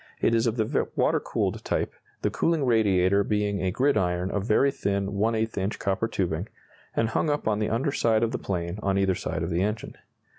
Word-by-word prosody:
It 115 Hz, -, +2 dB
is 115 Hz, +1 st, +2 dB
of 115 Hz, +1 st, -1 dB
the 110 Hz, -1 st, 0 dB
water -, -, +2 dB
cooled -, -, -2 dB
type, -, -, -1 dB, 0.3 s
the -, -, +1 dB
cooling 165 Hz, -4 st, +1 dB
radiator 100 Hz, -4 st, +3 dB
being 105 Hz, -2 st, 0 dB
a 95 Hz, -, +1 dB
gridiron 90 Hz, -7 st, +1 dB
of 100 Hz, +1 st, -2 dB
very 135 Hz, +5 st, +4 dB
thin 100 Hz, -5 st, -1 dB
⅛ 110 Hz, +2 st, 0 dB
inch 95 Hz, +3 st, -2 dB
copper 100 Hz, +3 st, 0 dB
tubing, 90 Hz, -2 st, -2 dB, 0.5 s
and 115 Hz, -, +1 dB
hung 155 Hz, -, 0 dB
up 145 Hz, -5 st, -1 dB
on 105 Hz, -1 st, +1 dB
the 105 Hz, -, 0 dB
under 120 Hz, +6 st, 0 dB
side 115 Hz, -4 st, +2 dB
of 115 Hz, -, +1 dB
the -, -, -3 dB
plane 85 Hz, 0 st, -3 dB
on 100 Hz, -1 st, +1 dB
either 95 Hz, -1 st, +2 dB
side -, -, -3 dB
of -, -, -3 dB
the 85 Hz, +2 st, +1 dB
engine. 105 Hz, +2 st, -2 dB
105 Hz, 210 wpm, -26 LUFS, 95-115 Hz, 0.5 s, very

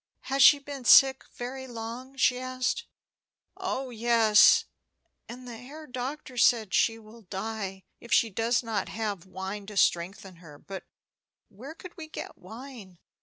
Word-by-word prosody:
"Has 275 Hz, +1 st, -1 dB
she 290 Hz, -, +9 dB
been 280 Hz, -2 st, -8 dB
sick 265 Hz, +2 st, +6 dB
very 260 Hz, +2 st, -6 dB
long?" 240 Hz, +3 st, -7 dB
she 255 Hz, -1 st, +2 dB
asked. 255 Hz, -, -2 dB, 0.7 s
"Oh 260 Hz, -1 st, -4 dB
yes; 225 Hz, -2 st, +5 dB, 0.6 s
and 250 Hz, +1 st, -9 dB
the 235 Hz, -2 st, -8 dB
Herr 285 Hz, +6 st, -11 dB
Doctor 255 Hz, 0 st, -6 dB
says 230 Hz, -3 st, +4 dB
she 225 Hz, -1 st, +2 dB
will 225 Hz, +1 st, -15 dB
die 195 Hz, -1 st, -5 dB, 0.2 s
if 235 Hz, -, -14 dB
she 225 Hz, -, +4 dB
does 230 Hz, +4 st, 0 dB
not 220 Hz, -4 st, -2 dB
have 205 Hz, -5 st, -4 dB
wine 190 Hz, +2 st, -6 dB
to 210 Hz, -1 st, -8 dB
strengthen 185 Hz, +1 st, 0 dB
her. 160 Hz, -4 st, -14 dB
But 195 Hz, +4 st, -9 dB, 0.6 s
where 265 Hz, +10 st, -11 dB
could 360 Hz, +1 st, -12 dB
we 320 Hz, -2 st, -8 dB
get 310 Hz, -, -8 dB
wine? 220 Hz, -1 st, -11 dB
235 Hz, 150 wpm, -28 LUFS, 205-260 Hz, 0.7 s, she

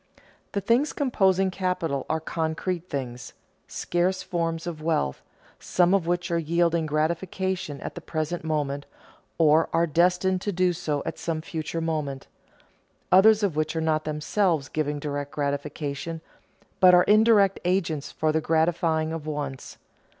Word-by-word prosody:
The 200 Hz, -, -1 dB
things 240 Hz, +9 st, +2 dB
composing 195 Hz, -8 st, +2 dB
capital 180 Hz, -7 st, -2 dB
are 160 Hz, -, +1 dB
concrete 165 Hz, +2 st, -3 dB
things, 125 Hz, -4 st, -5 dB, 0.3 s
scarce 185 Hz, +2 st, -1 dB
forms 165 Hz, -1 st, -2 dB
of 165 Hz, -3 st, -5 dB
wealth, 155 Hz, -, -1 dB, 0.4 s
some 180 Hz, +1 st, +2 dB
of 190 Hz, -4 st, +2 dB
which 175 Hz, +1 st, -1 dB
are 170 Hz, -, +2 dB
yielding 170 Hz, 0 st, +1 dB
gratification 165 Hz, +1 st, -2 dB
at -, -, -5 dB
the 175 Hz, -, -8 dB
present 160 Hz, +1 st, -3 dB
moment, 145 Hz, -3 st, -2 dB, 0.5 s
or 160 Hz, 0 st, +4 dB
are 165 Hz, +1 st, +3 dB
destined 180 Hz, +3 st, +2 dB
to 205 Hz, -, -2 dB
do 180 Hz, -1 st, +2 dB
so 155 Hz, -4 st, -2 dB
at -, -, -5 dB
some 165 Hz, -2 st, -2 dB
future 165 Hz, 0 st, -4 dB
moment; 150 Hz, -4 st, -3 dB, 0.9 s
others 210 Hz, +3 st, +6 dB
of 190 Hz, -7 st, +1 dB
which 155 Hz, +1 st, -1 dB
are -, -, 0 dB
not 155 Hz, -1 st, 0 dB
themselves 155 Hz, 0 st, 0 dB
giving 150 Hz, -1 st, -2 dB
direct 145 Hz, -1 st, -4 dB
gratification, 145 Hz, +2 st, -3 dB, 0.6 s
but 180 Hz, -1 st, +8 dB
are 180 Hz, -, +6 dB
indirect 210 Hz, -2 st, +4 dB
agents 170 Hz, -5 st, -1 dB
for 155 Hz, 0 st, 0 dB
the 160 Hz, +1 st, 0 dB
gratifying 160 Hz, 0 st, +1 dB
of 160 Hz, -2 st, -6 dB
wants. 145 Hz, -3 st, -5 dB
165 Hz, 145 wpm, -25 LUFS, 155-180 Hz, 0.9 s, but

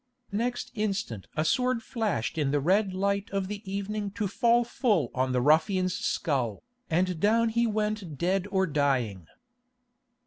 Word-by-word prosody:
Next 240 Hz, +4 st, -2 dB
instant 200 Hz, -, -2 dB
a 155 Hz, -, +1 dB
sword 250 Hz, +4 st, +1 dB
flashed 210 Hz, -, -2 dB
in 145 Hz, -2 st, +1 dB
the 145 Hz, +1 st, +2 dB
red 190 Hz, +7 st, +2 dB
light 200 Hz, +2 st, -1 dB
of 195 Hz, -1 st, -2 dB
the 205 Hz, 0 st, -5 dB
evening 200 Hz, +1 st, -3 dB
to 210 Hz, -, 0 dB
fall 235 Hz, +4 st, +3 dB
full 215 Hz, -, +1 dB
on 130 Hz, 0 st, 0 dB
the 125 Hz, -1 st, +1 dB
ruffian's 180 Hz, +5 st, +3 dB
skull, 130 Hz, -, -1 dB, 0.3 s
and 180 Hz, +1 st, +1 dB
down 225 Hz, +4 st, +3 dB
he 235 Hz, +1 st, +1 dB
went 210 Hz, -7 st, -2 dB
dead 185 Hz, +4 st, 0 dB
or 190 Hz, -1 st, +2 dB
dying. 130 Hz, -, 0 dB
195 Hz, 150 wpm, -28 LUFS, 150-215 Hz, 0.3 s, fall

